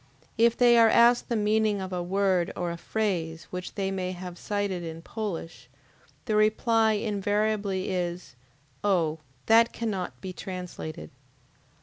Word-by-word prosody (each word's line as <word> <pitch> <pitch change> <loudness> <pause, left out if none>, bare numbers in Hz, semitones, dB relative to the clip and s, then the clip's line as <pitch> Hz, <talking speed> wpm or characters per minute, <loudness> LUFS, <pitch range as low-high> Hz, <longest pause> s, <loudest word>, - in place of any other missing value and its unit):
If 235 0 +3
they 240 -1 +6
are 225 -1 +7
asked 235 +2 +4
the 235 - 0
meaning 215 -1 +2
of 190 -1 -5
a 180 - -1
word 185 -1 +1
or 175 -1 -2
a - - -4
phrase 170 -4 -2
which 180 0 -6
they 195 -1 -1
may 185 -1 -3
have 180 -1 -7
cited 205 -3 -2
in 165 0 -7
Polish, 165 - -6 0.6
the 215 - 0
reply 220 +1 +3
invariably 205 -2 -1
is: 175 -5 -3 0.5
"Oh, 165 -6 +1 0.3
that 230 +1 +5
cannot 205 -6 -3
be 185 -1 -6
translated!" 180 - -7
195 Hz, 140 wpm, -27 LUFS, 180-215 Hz, 0.6 s, are